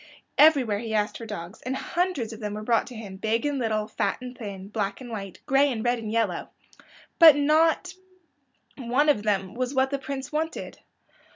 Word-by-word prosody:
Everywhere 275 -9 +5
he 220 -1 -3
asked 210 0 0
for 230 - -7
dogs, 190 -1 -7
and 255 +2 -3
hundreds 330 -8 -2
of 220 - -10
them 210 -2 -4
were 215 - -5
brought 230 +1 +2
to 250 - -10
him, 205 -4 -8
big 220 +5 0
and 290 -2 0
little, 215 -3 -1
fat 220 - -1
and 250 0 -8
thin, 195 -4 -7
black 200 -2 -2
and 250 -2 -9
white, 195 -4 -6
and - - -33
gray 275 +1 +3
and 225 -2 -4
red 240 0 +2
and 215 -2 -5
yellow. 225 -6 -1 0.7
But 325 -4 +10
not 315 +5 +2 0.9
one 260 +5 +2
of 280 -8 +3
them 195 -3 -1
was 255 +2 -3
what 265 +1 +2
the 280 - -1
Prince 270 -1 -6
wanted. 315 +2 -3
235 Hz, 200 wpm, -26 LUFS, 215-275 Hz, 0.9 s, But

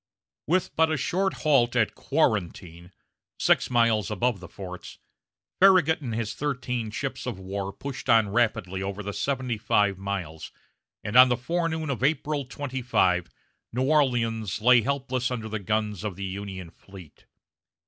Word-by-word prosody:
With 180 +4 0
but 160 0 +3
a 155 - 0
short 190 +8 0
halt 125 -5 +3
at 115 -3 +2
Quarantine, 90 - -1 0.5
six - - +2
miles 115 -5 +2
above 110 +1 0
the 95 - -10
forts, 90 -1 -9 0.6
Farragut 180 -5 +5
and 120 -5 -4
his 115 -2 -2
thirteen 125 -5 -3
ships 130 +4 -5
of 120 -6 -3
war 95 +1 -5
pushed 135 +5 -7
on 115 -3 +5
rapidly 100 -4 0
over 100 +1 -4
the 100 0 -5
seventy 130 -4 -2
five 100 -2 +1
miles, 95 -6 -5 0.5
and 105 - -5
on 125 +1 +9
the 125 - +1
forenoon 160 +2 -2
of 130 -2 -4
April 150 -1 0
25 125 -9 0 0.4
New 125 +2 0
Orleans 120 - +1
lay 125 +2 +6
helpless 130 -1 -1
under 120 -3 -4
the 110 0 -4
guns 105 0 -2
of 105 -4 -4
the 100 +1 -5
Union 95 -2 -6
fleet. 95 -4 -15
115 Hz, 150 wpm, -26 LUFS, 100-135 Hz, 0.6 s, on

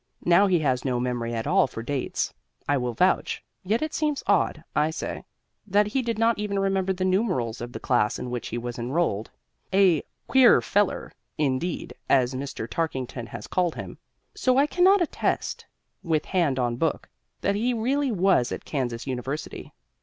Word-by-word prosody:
Now 175 +4 +5
he 185 -2 +3
has 130 -4 +1
no 125 -3 0
memory 120 -2 -2
at 115 - -3
all - - +4
for 115 - -7
dates, 135 +1 -2 0.3
I 145 - +3
will 125 -3 -2
vouch; 185 +9 +1 0.2
yet 215 +8 0
it 310 0 -3
seems 300 -2 -1
odd 180 -5 +1
(I 150 +1 +3
say) 160 - -5 0.4
that 205 +1 +3
he 235 +6 0
did 230 -3 -2
not 225 0 +2
even 205 -1 -2
remember 195 -1 +1
the 185 0 -1
numerals 185 - 0
of 120 0 -5
the - - -6
class 115 -4 +1
in 125 - -5
which 120 -1 -3
he 120 - -4
was 120 0 -5
enrolled. 120 -4 -1 0.4
A 190 -5 +4 0.3
"queer 260 -3 +6
feller," 205 -1 0 0.3
indeed, 150 +4 -1 0.2
as 130 -1 +3
Mr. 130 -3 -5
Tarkington 130 -6 -3
has - - -8
called 180 -3 0
him. - - -8 0.3
So 255 0 +2
I 280 - +5
cannot 365 +4 +4
attest, 325 - -2 0.3
with 160 -4 0
hand 165 -8 +1
on 120 -2 0
Book, 160 +3 -1 0.3
that - - +1
he 230 +5 +1
really 260 +4 0
was 190 - +2
at - - -5
Kansas 120 -5 -3
University. 135 +3 -5
165 Hz, 175 wpm, -26 LUFS, 125-205 Hz, 0.4 s, queer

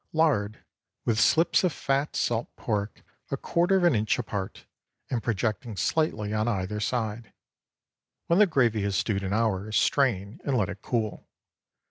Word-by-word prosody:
Lard 135 -10 +1 0.4
with 115 -2 +1
slips 165 +10 +4
of 180 - +2
fat 140 0 -1
salt 120 0 -1
pork 105 -2 -3 0.3
a - - -2
quarter 175 +3 +2
of 185 - +1
an 175 -3 +5
inch 110 -2 +1
apart, 100 -5 -5 0.5
and 120 -3 0
projecting 110 0 -2
slightly 110 -10 0
on 110 +1 0
either 105 -1 -1
side. 110 0 -2 0.9
When 170 +3 +3
the 210 - +7
gravy 120 - +2
has 100 -1 -1
stewed 100 0 0
an 95 -1 -3
hour, 110 -1 0
strain 105 -4 +1
and 135 -3 0
let 105 -5 +1
it 100 - -7
cool. 110 -5 -3
110 Hz, 155 wpm, -27 LUFS, 105-135 Hz, 0.9 s, the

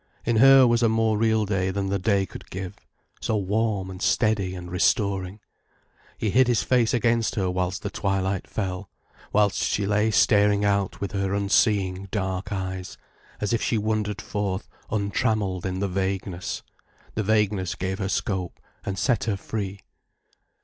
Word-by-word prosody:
In 115 -1 +2
her 135 +2 +8
was 120 0 +3
a 115 - +4
more 110 0 +2
real 110 0 +2
day 95 -2 0
than 95 0 -2
the 100 0 0
day 100 0 +2
could - - -11
give: 95 +1 -5 0.5
so 110 - 0
warm 100 -1 -1
and 95 - -9
steady 100 -1 +1
and 90 -1 -8
restoring. 95 +1 +1 0.8
He 105 - -1
hid 130 +4 +4
his 120 -2 +2
face 120 -3 +2
against 115 -1 +1
her 95 -3 0
whilst 90 +1 -2
the 105 - -3
twilight 95 0 -1
fell, 95 -2 -4 0.4
whilst 105 -1 +2
she 100 - 0
lay 105 +2 +2
staring 105 -1 +4
out 100 -1 0
with 100 - -3
her 100 -1 -1
unseeing 100 -1 +1
dark 95 -1 -3
eyes, 95 -2 -4 0.4
as 105 +2 -1
if 115 - +1
she 115 - +1
wandered 105 -1 -1
forth 100 -1 -3 0.2
untrammelled 100 -3 0
in 95 +1 -3
the 100 - +1
vagueness. 95 -1 -3 0.5
The 110 - -1
vagueness 105 -3 +1
gave 95 +1 -3
her 95 -2 -2
scope 95 -3 -2 0.2
and 95 -1 -3
set 120 +1 +1
her 105 -4 0
free. 100 -1 -5
100 Hz, 165 wpm, -25 LUFS, 95-110 Hz, 0.8 s, her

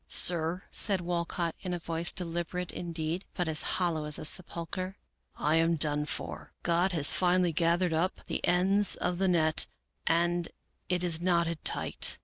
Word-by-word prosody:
" - - -43 0.2
Sir," 175 +1 -1
said 200 -3 +3
Walcott, 170 -1 -2
in 180 -2 -3
a - - -3
voice 165 0 -1
deliberate, 175 0 -4
indeed, 170 +1 -4
but 175 -2 -1
as 160 0 +3 0.2
hollow 170 -4 -1
as 150 -1 -2
a - - -5
sepulcher, 185 +3 +1 0.2
" - - -47
I 155 +2 +1
am 165 +1 +2
done 150 -1 0
for. - - -6
God 175 +2 +1
has 150 -4 +5
finally 180 -1 +2
gathered 170 +2 +1
up 175 +4 -1
the - - -4
ends 195 +3 +3
of 180 0 -2
the 195 - +2
net, 160 -3 +2 0.4
and 175 +1 +1 0.4
it 180 -1 +1
is 170 -2 +1
knotted 170 -3 0
tight." - - 0
170 Hz, 170 wpm, -29 LUFS, 165-180 Hz, 0.4 s, has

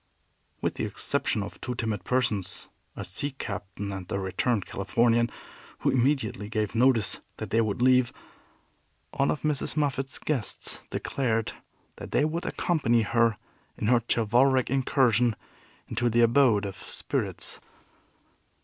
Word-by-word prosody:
With - - 0
the - - -2
exception 105 - 0
of 100 - -9
two 125 - -3
timid 110 -3 -2
persons, 110 -7 0 0.3
a - - -5
sea 140 +10 -2
captain 100 -3 -5
and 95 -2 -7
a - - 0
returned 100 +3 0
Californian, 115 +4 +2 0.5
who - - +2
immediately 125 -5 +1
gave 110 -2 -1
notice 120 -3 +3 0.2
that - - -6
they 115 - +4
would 110 +2 -1
leave, 130 -1 +5 1.0
all 140 0 +1
of 150 - -1
Mrs. 150 0 0
Moffat's 135 -2 0
guests 135 -9 -2
declared 115 -5 -1 0.4
that - - -8
they 145 - +4
would 165 +3 -2
accompany 120 -9 +2
her 115 0 +2 0.4
in 105 - -1
her 120 -1 +5
chivalric 125 +3 +3
incursion 125 -4 +3 0.5
into 120 - 0
the 120 +1 +3
abode 115 -3 +4
of 100 -1 -5
spirits. - - -3
120 Hz, 135 wpm, -27 LUFS, 105-130 Hz, 1.0 s, leave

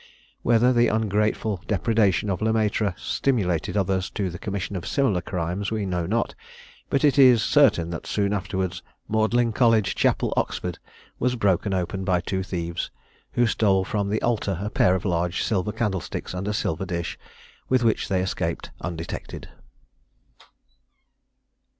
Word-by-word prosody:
Whether 120 +2 +4
the 120 0 +4
ungrateful 105 -2 0
depredation 105 -1 +2
of 90 - -3
Le 110 +1 +2
Maitre 105 -3 +1
stimulated 95 - 0
others 95 -1 0
to 95 -4 -2
the 90 - -8
commission 100 0 -4
of 90 - -4
similar 120 -11 +1
crimes 90 +3 -3
we 110 -2 -2
know 90 -3 -2
not, 115 +5 0 0.6
but 140 - +1
it 145 -2 +4
is 125 -5 +7
certain 105 - +4
that 80 - -6
soon 100 -1 0
afterwards 95 -3 -2 0.3
Magdalen 110 +2 +2
College 115 -4 +3
Chapel, - - +1
Oxford, 90 -2 -2 0.4
was 125 0 +1
broken 100 -3 +1
open 95 +1 -2
by 90 -2 +2
two 95 +2 -2
thieves, 85 -2 -3 0.4
who 120 - +3
stole 100 -4 +2
from 100 0 -1
the 110 +2 -1
altar 105 -6 0
a 105 - -3
pair 90 - +3
of 95 - -3
large 85 -1 0
silver 105 -2 0
candlesticks 105 -6 -3
and 90 +2 -4
a - - 0
silver 95 0 -2
dish, 85 -1 -4 0.5
with 130 -1 +3
which 115 -2 +1
they 95 -2 +1
escaped 95 - -3
undetected. 85 -1 -6
100 Hz, 150 wpm, -24 LUFS, 90-110 Hz, 0.6 s, is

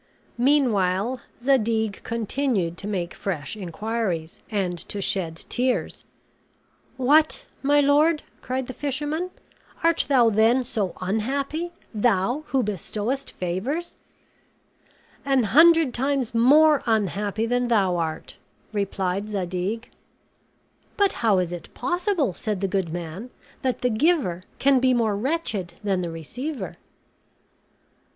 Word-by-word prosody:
Meanwhile, 240 -4 +2 0.2
Zadig 225 -5 +1
continued 230 -5 -1
to 200 - -6
make 180 -4 -2
fresh 175 -2 -4
inquiries, 195 -3 -3
and 195 -4 -1
to 205 - -3
shed 185 -5 -2
tears. 250 +1 -1 0.9
"What, 295 +4 +3 0.2
my 290 +1 +4
lord!" 295 +3 +3 0.2
cried 260 0 -2
the 255 - -7
fisherman, 295 +6 -2 0.5
"art 335 0 +3
thou 245 -5 +5
then 225 +5 +4
so 215 -6 -2
unhappy, 275 - -2 0.2
thou 230 +6 +1
who 265 -2 +1
bestowest 210 +6 -3
favors?" 235 - -3 1.3
"An 270 -3 +2
hundred 320 +4 +6
times 270 -2 0
more 290 +6 +6
unhappy 210 0 0
than 245 +1 +1
thou 195 -6 +2
art," 160 -2 -4 0.4
replied 195 0 -1
Zadig. 195 +3 -3 1.1
"But 400 -1 +3
how 220 -4 +4
is 180 -1 0
it 175 - -8
possible," 355 - 0
said 210 +2 -3
the 195 - +1
good 190 -3 -1
man, 175 +7 -6 0.3
"that 255 -2 -1
the 250 - +1
giver 220 - +1
can 275 -1 +4
be 255 0 +3
more 220 -3 +1
wretched 215 - -2
than 195 -3 0
the 175 - -3
receiver?" 245 - -5
225 Hz, 115 wpm, -24 LUFS, 195-275 Hz, 1.3 s, hundred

